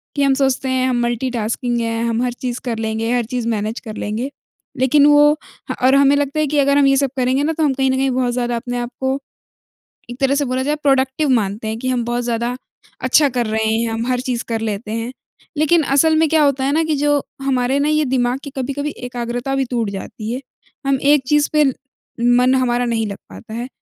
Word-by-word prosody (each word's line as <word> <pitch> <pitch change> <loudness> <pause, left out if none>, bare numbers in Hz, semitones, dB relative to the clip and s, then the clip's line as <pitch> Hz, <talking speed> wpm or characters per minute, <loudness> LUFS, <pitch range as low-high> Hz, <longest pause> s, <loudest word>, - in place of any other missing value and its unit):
कि 285 - +1
हम 275 -1 +4
सोचते 265 -1 0
हैं 260 0 +1
हम 245 -1 0
मल्टी-टास्किंग 240 0 -1
हैं, 230 0 -1
हम 230 0 0
हर 250 -1 -1
चीज़ 245 0 -4
कर 235 -3 -2
लेंगे, 225 +1 -2
हर 245 -2 +1
चीज़ 245 0 -3
मैनेज 220 0 -2
कर 215 -3 -8
लेंगे। 225 +7 -3 0.5
लेकिन 265 +3 +4
वो 295 0 +6 0.4
ह - - -3
और 260 +1 +5
हमें 280 0 +5
लगता 285 +1 -1
है 305 - +2
कि 295 +1 -1
अगर 280 0 +3
हम 285 - +5
ये 275 - +4
सब 275 0 +2
करेंगे 260 +2 +1
ना, 320 +2 0
तो 320 - -1
हम 290 -3 +2
कहीं 265 0 +1
न - - +1
कहीं 270 +1 +1
बहुत 250 -1 0
ज़्यादा 240 -1 -1
अपने 245 +1 -4
आपको, 265 +3 -2 0.9
एक 245 +1 -8
तरह 275 0 +2
से 285 0 +1
बोला 255 0 -1
जाए 295 +2 0
प्रोडक्टिव 270 +1 +2
मानते 220 -3 0
हैं 220 +1 -3
कि 255 - -2
हम 250 -2 0
बहुत 240 +1 -1
ज़्यादा 235 +1 -1 0.5
अच्छा 280 +3 +4
कर 245 -2 -1
रहे 220 0 -1
हैं, 230 +1 0
हम 225 +1 -2
हर 250 -1 +1
चीज़ 250 -2 -2
कर 225 -1 -1
लेते 215 0 -3
हैं। 230 +2 -3 0.5
लेकिन 310 +2 +3
असल 290 +3 +3
में 320 0 +3
क्या 315 -1 +4
होता 275 -2 +2
है 275 - +1
ना, 320 +3 +2
कि 315 -1 0
जो 290 0 +1 0.2
हमारे 265 0 +1
ना 290 +1 +1
ये 305 0 +2
दिमाग़ 250 -1 0
की 285 - -6
कभी-कभी 280 +3 -2
एकाग्रता 245 +2 -3
भी 270 0 +1
टूट 230 -4 0
जाती 210 +3 -6
है। 255 - -4 0.5
हम 275 -1 +3
एक 290 -1 +4
चीज़ 295 +1 +3
पे, 305 0 +5 0.7
मन 250 +1 +4
हमारा 245 -1 +1
नहीं 230 -2 0
लग 200 -1 -6
पाता 220 - -11
है। 240 +2 -4
255 Hz, 230 wpm, -19 LUFS, 235-280 Hz, 0.9 s, वो